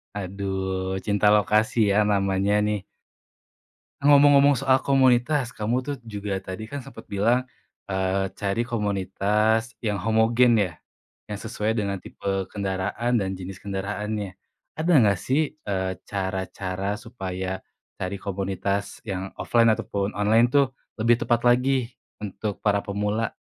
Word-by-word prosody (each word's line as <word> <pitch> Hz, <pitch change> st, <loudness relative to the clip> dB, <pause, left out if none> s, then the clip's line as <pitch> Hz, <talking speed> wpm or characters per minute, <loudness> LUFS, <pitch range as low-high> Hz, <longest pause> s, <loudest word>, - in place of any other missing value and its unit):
Aduh, 95 Hz, -1 st, -3 dB
cinta 105 Hz, 0 st, +2 dB
lokasi 105 Hz, +1 st, +3 dB
ya 100 Hz, -, +2 dB
namanya 100 Hz, 0 st, +1 dB
nih. 105 Hz, -2 st, -2 dB, 1.2 s
Ngomong-ngomong 145 Hz, -1 st, +6 dB
soal 135 Hz, -1 st, +3 dB
komunitas, 130 Hz, 0 st, +3 dB
kamu 115 Hz, +4 st, 0 dB
tuh 140 Hz, +2 st, -4 dB
juga 105 Hz, -3 st, -4 dB
tadi 95 Hz, +4 st, -6 dB
kan 140 Hz, +3 st, -6 dB
sempet -, -, -12 dB
bilang, 115 Hz, +6 st, +1 dB, 0.4 s
eee, 95 Hz, 0 st, 0 dB
cari 105 Hz, +4 st, -1 dB
komunitas 105 Hz, +1 st, 0 dB
yang 105 Hz, -3 st, -1 dB
homogen 115 Hz, +2 st, +4 dB
ya? 90 Hz, -5 st, 0 dB, 0.5 s
Yang 105 Hz, +1 st, -6 dB
sesuai 110 Hz, +1 st, -1 dB
dengan 100 Hz, -3 st, -1 dB
tipe 95 Hz, 0 st, -3 dB
kendaraan 100 Hz, +5 st, -1 dB
dan 95 Hz, -2 st, -2 dB
jenis 95 Hz, 0 st, -8 dB
kendaraannya. 100 Hz, 0 st, -4 dB, 0.4 s
Ada 160 Hz, +3 st, 0 dB, 0.2 s
gak 100 Hz, -, 0 dB
sih, 150 Hz, -, -1 dB
eee, 95 Hz, -7 st, -2 dB
cara-cara 95 Hz, 0 st, -3 dB
supaya 95 Hz, -4 st, -5 dB, 0.4 s
cari 95 Hz, +1 st, -3 dB
komunitas 100 Hz, 0 st, -3 dB
yang 95 Hz, -2 st, -5 dB
offline 115 Hz, -1 st, +3 dB
ataupun 100 Hz, -2 st, -3 dB
online 110 Hz, +3 st, +4 dB
tuh 140 Hz, -2 st, +4 dB, 0.3 s
lebih 115 Hz, +1 st, +4 dB
tepat 120 Hz, 0 st, +2 dB
lagi 125 Hz, 0 st, +2 dB, 0.3 s
untuk 105 Hz, 0 st, -5 dB
para 100 Hz, -1 st, +3 dB
pemula? 105 Hz, +2 st, -1 dB
105 Hz, 125 wpm, -25 LUFS, 95-115 Hz, 1.2 s, Ngomong-ngomong